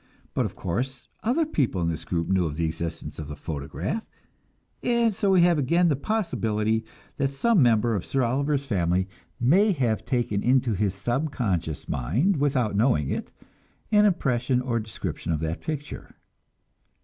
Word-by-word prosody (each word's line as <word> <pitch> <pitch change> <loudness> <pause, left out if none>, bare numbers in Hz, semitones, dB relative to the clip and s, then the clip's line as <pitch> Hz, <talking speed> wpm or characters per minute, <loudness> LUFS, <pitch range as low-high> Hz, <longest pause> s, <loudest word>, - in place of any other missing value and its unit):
But, - - +1
of - - -11
course, 125 +8 -3
other 260 +9 +2
people 135 - 0
in 85 - 0
this 80 -2 -3
group 85 -2 -1
knew 95 -2 +2
of 75 - -5
the 85 - +1
existence 80 0 -5
of 75 - -5
the 75 - -6
photograph, 75 - -4 0.8
and 235 -2 +2
so 200 +1 0
we 185 -3 +5
have 175 -3 +4
again 170 +6 +3
the 145 - +2
possibility 110 - 0 0.3
that 140 -1 0
some 225 +4 +3
member 115 -2 +4
of 95 - -2
Sir 135 -1 0
Oliver's 140 +3 0
family 95 -5 +1 0.3
may 190 - +4
have 120 -8 0
taken 120 -6 0
into 125 -2 +3
his 95 -1 0
subconscious 100 - -2
mind 130 - +1
without 130 -7 +1
knowing 105 - +2
it - - -4 0.6
an 210 -1 +6
impression 125 - +1
or 125 -2 -1
description 110 -5 -4
of 75 - -1
that 80 +2 -3
picture. 150 -2 -6
120 Hz, 160 wpm, -26 LUFS, 95-150 Hz, 0.8 s, an